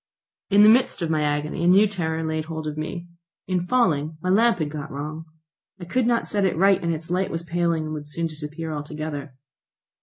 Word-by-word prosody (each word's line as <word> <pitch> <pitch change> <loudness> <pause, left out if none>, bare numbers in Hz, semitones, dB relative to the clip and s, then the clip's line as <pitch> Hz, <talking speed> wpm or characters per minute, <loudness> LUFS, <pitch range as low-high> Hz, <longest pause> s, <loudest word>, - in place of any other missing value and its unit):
In 205 +1 +6
the 215 - +8
midst 240 -5 +3
of 165 - -1
my 155 -1 +1
agony 150 +2 -1
a - - +3
new 195 +4 +6
terror 165 -5 -2
laid 160 -1 -2
hold 160 -1 -5
of 150 -1 -3
me. 170 +3 -5 0.4
In 180 -1 -1
falling 160 - +1
my 180 +3 -3
lamp 230 +1 +4
had 155 -3 -2
got 150 0 -6
wrong. 155 +3 -6 0.5
I 175 - -7
could 240 +7 0
not 235 -1 +2
set 205 -2 0
it 185 -4 +1
right, 195 +2 +4
and 170 - 0
its 165 +1 -5
light 185 +1 0
was 165 0 -4
paling 170 -1 0
and 155 0 -5
would 150 -1 -6
soon 165 +2 -2
disappear 155 0 -5
altogether. 150 -2 -6
165 Hz, 215 wpm, -24 LUFS, 155-185 Hz, 0.5 s, the